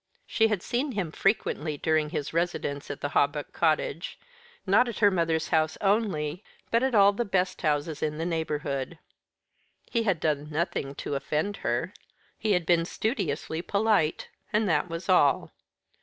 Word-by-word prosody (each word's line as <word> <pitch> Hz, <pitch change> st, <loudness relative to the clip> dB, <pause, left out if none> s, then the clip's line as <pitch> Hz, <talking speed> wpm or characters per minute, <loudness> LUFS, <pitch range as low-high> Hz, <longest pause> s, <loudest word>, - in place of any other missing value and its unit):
She 225 Hz, -, +2 dB
had 210 Hz, -5 st, -1 dB
seen 260 Hz, +3 st, -1 dB
him 190 Hz, -7 st, -2 dB
frequently 160 Hz, -6 st, 0 dB
during 155 Hz, 0 st, +1 dB
his 145 Hz, 0 st, -4 dB
residence 165 Hz, -4 st, -2 dB
at 145 Hz, 0 st, -6 dB
the 145 Hz, -, -1 dB
Hawbuck 145 Hz, +1 st, 0 dB
cottage, 160 Hz, 0 st, 0 dB, 0.5 s
not 220 Hz, +6 st, +4 dB
at 230 Hz, -, -6 dB
her 205 Hz, -2 st, +5 dB
mother's 165 Hz, -3 st, 0 dB
house 160 Hz, -1 st, +1 dB
only, 195 Hz, -5 st, 0 dB, 0.3 s
but 230 Hz, -, +3 dB
at 260 Hz, -2 st, +1 dB
all 200 Hz, -1 st, +6 dB
the 240 Hz, -, -1 dB
best 190 Hz, -4 st, -1 dB
houses 150 Hz, -1 st, -1 dB
in 150 Hz, -1 st, -1 dB
the 165 Hz, -, -2 dB
neighbourhood. 150 Hz, -3 st, -2 dB, 0.9 s
He 230 Hz, -, +2 dB
had 195 Hz, -7 st, +1 dB
done 150 Hz, -1 st, -1 dB
nothing 150 Hz, -3 st, -2 dB
to -, -, -4 dB
offend 155 Hz, +8 st, -1 dB
her. -, -, -2 dB, 0.5 s
He 215 Hz, -2 st, +1 dB
had 180 Hz, -2 st, +1 dB
been 170 Hz, 0 st, +3 dB
studiously 170 Hz, -, -2 dB
polite; 200 Hz, -5 st, +1 dB, 0.2 s
and 210 Hz, 0 st, +2 dB
that 160 Hz, 0 st, +1 dB
was 165 Hz, +2 st, -5 dB
all. 145 Hz, -8 st, +3 dB
165 Hz, 160 wpm, -27 LUFS, 150-200 Hz, 0.9 s, all